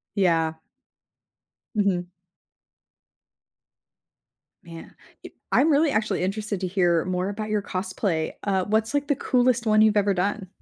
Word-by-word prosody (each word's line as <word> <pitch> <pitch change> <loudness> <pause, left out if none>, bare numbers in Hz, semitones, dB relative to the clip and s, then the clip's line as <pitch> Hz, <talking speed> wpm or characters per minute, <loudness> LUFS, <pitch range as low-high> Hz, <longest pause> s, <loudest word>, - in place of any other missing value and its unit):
Yeah. 165 -5 +2 1.2
Mhm. 195 -4 0 2.6
Man, 165 -1 -11 0.3
i - - -7 0.2
I'm 315 - +4
really 300 +1 +3
actually 215 -4 0
interested 205 +1 -3
to 185 - -2
hear 175 -3 +1
more 180 +1 -2
about 215 +1 -5
your 210 -1 0
cosplay, 185 -4 -2
uh, 190 -2 0
what's 220 +4 0
like, 285 0 0
the 285 - +3
coolest 245 -2 +1
one 215 0 +4
you've 215 -1 +3
ever 200 -1 +3
done? 195 +1 -2
200 Hz, 130 wpm, -24 LUFS, 180-215 Hz, 2.6 s, I'm